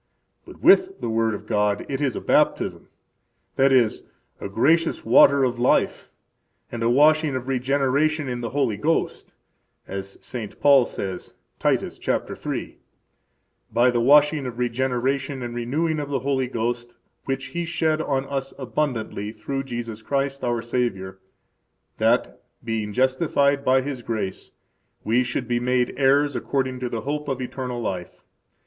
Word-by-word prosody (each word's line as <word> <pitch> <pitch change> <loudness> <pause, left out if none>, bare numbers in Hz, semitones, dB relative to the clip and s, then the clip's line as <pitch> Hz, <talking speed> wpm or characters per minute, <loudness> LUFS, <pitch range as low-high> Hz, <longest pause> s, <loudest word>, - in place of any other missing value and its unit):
But - - -13
with 380 0 +5
the 115 - -3
word 110 -1 +1
of 105 - -9
God 105 -1 0
it 135 0 -3
is 135 -5 0
a - - -4
baptism, - - +1 0.7
that 135 +1 +4
is, 120 -5 +3 0.4
a - - -5
gracious 160 +11 +2
water 135 +4 +6
of 125 -2 0
life 125 - +1 0.6
and 120 - -5
a 115 - +2
washing 150 +2 +4
of 130 0 -4
regeneration 140 +3 +1
in 125 -1 -3
the 115 - -3
Holy 135 -7 0
Ghost, 160 +9 -1 0.5
as 95 0 -6
St. 110 -5 -6
Paul 140 -4 +5
says, 95 -2 -6 0.2
Titus, - - 0
chapter - - -2
three: - - -5 0.9
By 120 +2 +4
the 120 - 0
washing 145 +2 +4
of 120 -2 -7
regeneration 130 +2 -1
and 120 -1 -5
renewing 150 +7 -1
of 145 -1 -4
the 140 - 0
Holy 135 -1 0
Ghost, 120 0 -3 0.3
which 135 -1 -3
He 170 0 -2
shed 160 -2 0
on 135 -3 -1
us 135 -1 -4
abundantly 120 -6 -3
through 135 +5 -4
Jesus 120 -3 -5
Christ, 140 +3 -2
our 120 -1 -1
Savior, 95 -6 -2 0.8
that, 60 - +1 0.2
being 110 -2 -3
justified 140 +3 +2
by 130 -1 +3
His 135 -3 -5
grace, 110 -5 -4 0.5
we 115 +3 +2
should 125 0 -3
be 120 -1 0
made 125 0 +1
heirs 140 +2 +3
according 130 -2 -2
to 125 -1 -3
the 115 -2 -3
hope 150 +4 -3
of 135 -2 -2
eternal 125 -1 -4
life. 95 -6 -5
130 Hz, 155 wpm, -23 LUFS, 115-140 Hz, 0.9 s, water